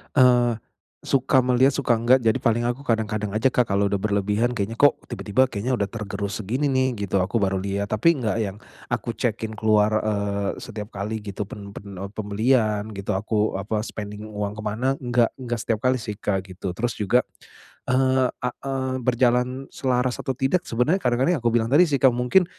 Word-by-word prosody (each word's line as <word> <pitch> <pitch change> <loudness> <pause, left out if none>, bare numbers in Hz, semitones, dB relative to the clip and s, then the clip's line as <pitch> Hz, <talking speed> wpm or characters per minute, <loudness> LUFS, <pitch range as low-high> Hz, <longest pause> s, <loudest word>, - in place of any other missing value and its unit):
Eee, 125 -3 +5 0.5
suka 130 0 +3
melihat, 130 +2 +4
suka 130 -4 +2
enggak. 120 +3 +4
Jadi 110 -1 +2
paling 120 +1 +1
aku 125 +3 -3
kadang-kadang 110 -4 -1
aja, 110 +5 +3
Kak, 125 -2 +2
kalau 100 0 +2
sudah 100 -1 -1
berlebihan, 105 +3 +1
kayaknya 105 +2 -2
kok 145 - +5
tiba-tiba, 120 +1 +1
kayaknya 115 +5 -1
sudah 100 -2 -1
tergerus 100 -2 -4
segini, 125 +9 -1
nih, 130 -1 +2 0.2
gitu. 95 +2 +1
Aku 110 +5 -1
baru 95 -1 +1
lihat, 100 +1 -3
tapi 165 +11 +4
enggak 115 -3 -1
yang 100 -2 -3 0.4
aku 120 -1 -1
cek-in 110 -2 -2
keluar, 105 0 +3
eee, 100 -1 -1
setiap 105 -1 -7
kali 105 +3 -3
gitu. 105 0 -5
Pen 100 -1 -9
pen 100 -1 -9
eee, 100 - -5
pembelian 110 0 0
gitu 100 -2 -4
aku 105 +1 0
apa, 105 +3 -2
spending 105 -1 -7
uang 105 -1 -4
kemana? 110 +5 -1
Enggak 120 -2 +2
enggak 120 -2 -3
setiap 110 -2 -1
kali, 130 0 +3
sih, 105 -2 -5
Kak, 95 -3 -1
gitu. 90 0 -5
Terus 120 +4 -1
juga, 105 +4 +3 0.7
eee, 130 0 +3
a 125 - -4
eee, 130 0 -3
berjalan 125 +2 +1
selaras 125 -1 0
atau 135 - -2
tidak. 135 +7 +1
Sebenernya 135 +12 +1
kadang-kadang 130 +8 +2
yang - - -8
aku 115 - +3
bilang 115 -1 +2
tadi, 160 +6 +6
sih, 140 - +1
Kak, 130 -2 +6
mungkin 125 +10 +3
115 Hz, 190 wpm, -24 LUFS, 105-125 Hz, 0.7 s, tadi